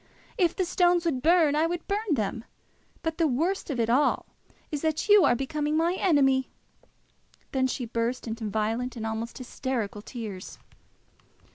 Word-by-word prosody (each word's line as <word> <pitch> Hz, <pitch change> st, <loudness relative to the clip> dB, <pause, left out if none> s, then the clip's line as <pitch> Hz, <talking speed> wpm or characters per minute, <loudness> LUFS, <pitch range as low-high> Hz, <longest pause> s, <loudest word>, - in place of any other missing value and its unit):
If 350 Hz, -5 st, +2 dB
the 375 Hz, -, 0 dB
stones 350 Hz, 0 st, +2 dB
would 275 Hz, -7 st, 0 dB
burn, 320 Hz, -1 st, +4 dB
I 315 Hz, +2 st, +3 dB
would 345 Hz, 0 st, -4 dB
burn 405 Hz, -4 st, 0 dB
them. 220 Hz, 0 st, -2 dB, 0.6 s
But 325 Hz, 0 st, -3 dB
the 330 Hz, -, +4 dB
worst 330 Hz, +10 st, -1 dB
of 265 Hz, -5 st, -2 dB
it 230 Hz, -, +2 dB
all 255 Hz, +6 st, +2 dB, 0.5 s
is, 295 Hz, -2 st, -2 dB
that 315 Hz, +2 st, -1 dB
you 415 Hz, -2 st, +7 dB
are -, -, +4 dB
becoming 295 Hz, +4 st, -1 dB
my 335 Hz, +2 st, +2 dB
enemy!" 275 Hz, -8 st, +3 dB, 1.0 s
Then 260 Hz, -1 st, +1 dB
she 255 Hz, -1 st, -3 dB
burst 235 Hz, +2 st, -2 dB
into 225 Hz, -1 st, -4 dB
violent 225 Hz, +4 st, -1 dB
and 225 Hz, -2 st, -5 dB
almost 225 Hz, +1 st, -4 dB
hysteric 255 Hz, -4 st, -3 dB
tears. 215 Hz, -7 st, -7 dB
270 Hz, 160 wpm, -27 LUFS, 235-330 Hz, 1.0 s, you